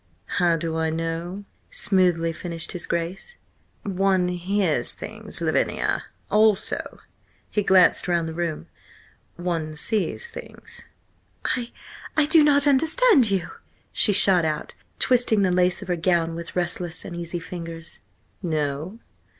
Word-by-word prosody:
"How 170 -1 +4
do 165 0 -3
I 160 0 0
know?" 165 +4 -4 0.2
smoothly 175 -4 +1
finished 165 -1 -4
his 180 - -4
Grace 175 - -4 0.5
"One 190 -2 +1
hears 180 -6 0
things, - - -8
Lavinia. - - 0 0.3
Also—" 210 -1 +1 0.5
he 210 - +1
glanced 190 -2 +4
round 170 -2 +1
the 160 - -5
room, 170 -2 -3 0.7
"one 165 -3 -3
sees 220 - +1
things." - - -10 0.7
"I–I 250 +5 -3
don't 295 -2 +5
understand 305 - +5
you!" 195 -3 -1 0.4
she 210 - +2
shot 190 -3 +4
out, 155 -1 -3 0.2
twisting 240 -5 +3
the 185 - +2
lace 180 0 +1
of - - -12
her 180 - 0
gown 170 -1 +1
with 170 0 -7
restless, 175 -1 -3
uneasy 170 -1 -5
fingers. 165 -1 -8 0.4
"No? 155 +2 -2
180 Hz, 120 wpm, -24 LUFS, 165-205 Hz, 0.7 s, don't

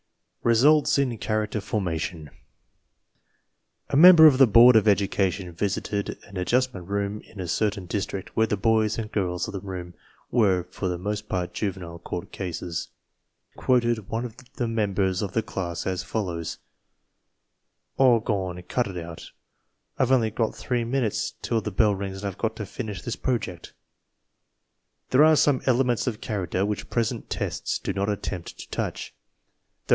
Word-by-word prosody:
RESULTS 140 +7 +4
IN 135 -4 +1
CHARACTER 110 0 -1
FORMATION 85 -6 -3 1.6
A - - -1
member 165 +1 +9
of 140 -4 +7
the 135 - +8
board 120 +3 +8
of 110 -1 +5
education 100 -2 +1
visited 100 +2 -2
an 100 - -14
Ad 90 - -3
justment 125 -8 0
Room 100 +1 -2
in 100 - -15
a 90 - -4
certain 100 +2 -1
district, 100 +1 -4
where 110 0 +3
the 105 - -1
boys 110 +1 +2
and 110 -1 -4
girls 90 -4 -1
of - - -5
the 100 - -4
room 90 -2 -7 0.4
were 100 -7 +3
for 90 +2 -5
the 90 -1 -2
most 105 +3 -4
part 90 -1 -2
juvenile 90 -5 -4
court 85 0 -6
cases. 85 -2 -4 0.6
He - - -16
afterward - - -13
quoted 120 -5 +2
one 115 +2 -2
of 120 -1 -9 0.2
the 120 - -1
members 100 -4 0
of 100 -3 -3
the 115 - +1
class 85 -3 -4
as 95 -1 -1
follows: 90 -5 -3 1.4
"A^rgwan! 100 -8 +2
Cut 125 -3 0
it 95 -2 -7
out! 85 -1 -8 0.7
I've 130 -1 +2
only 115 -4 +3
got 110 0 -1
three 120 -2 -1
minutes 120 -2 -1
till 115 -1 0
the 105 - -3
bell 105 +1 +3
rings 95 0 -5
and 100 -1 -2
Fve - - -23
got 110 - -1
to 105 - -5
finish 105 - -6
this - - -3
Project!" 100 -9 -3 1.4
There 130 +4 +6
are 155 0 +6
some 145 -2 +3
elements 125 -1 +2
of 115 -2 -3
character 100 -5 -1
which 105 0 -4
present 115 0 -2
tests - - -2
do - - -4
not 100 +1 -1
attempt 100 -3 -4
to - - -9
touch. - - -4 0.7
Those - - -34
105 Hz, 165 wpm, -25 LUFS, 95-115 Hz, 1.6 s, member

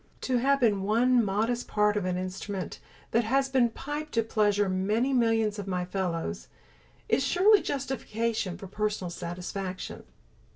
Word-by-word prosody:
To 255 -2 +1
have 275 +3 +3
been 215 -6 +3
one 235 +4 +3
modest 220 +4 0
part 210 0 +2
of 205 -3 -1
an 180 -1 -1
instrument 185 +1 -5 0.3
that 235 - +3
has 270 +4 +1 0.2
piped 295 +2 -5
to 230 - +2
pleasure 205 -2 +2
many 210 +8 +1
millions 225 -3 +2
of 200 - -5
my 180 -2 -1
fellows, 165 - -3 0.6
is - - +2
surely 380 - +5
justification 230 -7 -2
for - - -9
personal 205 -2 -2
satisfaction. 180 +2 -5
210 Hz, 140 wpm, -28 LUFS, 190-245 Hz, 0.6 s, surely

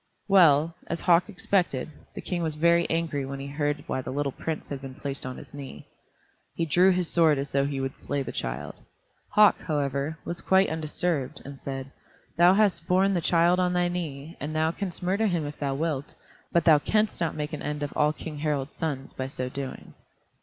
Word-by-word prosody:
Well, 165 -5 +5
as 170 - -3
Hauk 175 +2 +4
expected, 180 -8 0 0.2
the - - -5
King 180 -2 -2
was 160 -2 -1
very 170 +2 +3
angry 165 -4 -1
when 135 +1 -5
he 135 - -6
heard 145 +1 -2
why 130 - -2
the 130 - -7
little 140 +1 -1
prince 160 +4 -5
had 140 -2 -5
been 135 -1 -8
placed 140 -1 -2
on 130 - -6
his - - -12
knee. 140 -2 -9 0.7
He 165 - 0
drew 180 +5 +5
his 180 -2 +1
sword 160 -4 +4
as 140 0 -4
though 140 0 +2
he 140 -1 -3
would 135 0 -3
slay 140 -1 -3
the - - -5
child. - - -4 0.6
Hauk, 210 -1 +6
however, 145 0 -1
was 170 - -4
quite 190 -1 +3
undisturbed, 160 -2 -2
and 140 0 -9
said, 135 -1 -6 0.4
"Thou 175 +2 +6
hast 195 -5 +2
borne 190 +2 +3
the 175 - +1
child 170 +2 +3
on 180 -1 +2
thy 175 0 +2
knee, 160 -3 -5
and 150 +3 -4
thou 160 +1 +2
canst 185 0 -5
murder 195 +5 +1
him 170 -5 0
if 145 0 -7
thou 140 -2 -1
wilt, 145 -2 -2 0.4
but 170 -2 +2
thou 155 -3 +7
canst 215 +6 +1
not 165 - 0
make 150 0 -4
an 150 - -4
end 150 0 -3
of 145 - -4
all 150 0 +3
King 155 -1 -7
Harald's 145 -2 -2
sons 140 -5 -3
by 130 - -4
so 130 -2 -4
doing." 135 0 -6
155 Hz, 210 wpm, -27 LUFS, 140-175 Hz, 0.7 s, thou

